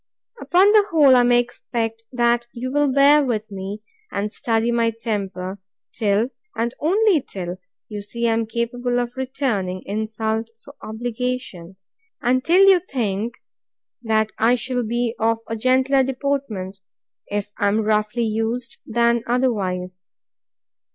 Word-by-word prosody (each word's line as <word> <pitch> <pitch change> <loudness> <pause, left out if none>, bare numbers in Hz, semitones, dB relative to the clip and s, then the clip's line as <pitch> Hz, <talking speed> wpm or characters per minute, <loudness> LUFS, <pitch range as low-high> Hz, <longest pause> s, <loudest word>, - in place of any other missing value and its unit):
Upon 380 +4 +4
the 425 -1 +6
whole, 290 -5 +6
I 250 - +6
may 245 0 +4
expect, 225 -2 -3
that 240 -1 +1
you 255 +1 -4
will 290 0 +2
bear 285 +2 +6
with 220 -5 -2
me, 195 +2 -6 0.3
and 205 +1 -2
study 230 -2 0
my 230 -1 +2
temper, 200 -4 -4 0.3
till, 215 +2 +1 0.3
and 235 +1 -1
only 380 +1 +3
till, 180 -5 -6 0.3
you 210 -2 -6
see 235 +3 -2
I 225 - +3
am 225 0 0
capable 245 +2 -1
of 245 0 -3
returning 250 -9 -2
insult 220 +2 -2 0.2
for 280 - -12
obligation; 225 -5 -4 0.4
and 255 -2 +1
till 370 +5 +5
you 380 -2 +7
think, 235 - -3 0.7
that 220 -2 +1
I 235 +2 +4
shall 250 +1 -2
be 235 0 -1
of 225 0 +2
a 225 - -3
gentler 260 +4 +3
deportment, 260 -8 -2 0.5
if 205 0 -3
I 205 - +2
am 210 +2 +2
roughly 215 +2 0
used, 225 +2 -2
than 235 +1 +2
otherwise. 185 -7 -1
235 Hz, 140 wpm, -22 LUFS, 215-255 Hz, 0.7 s, you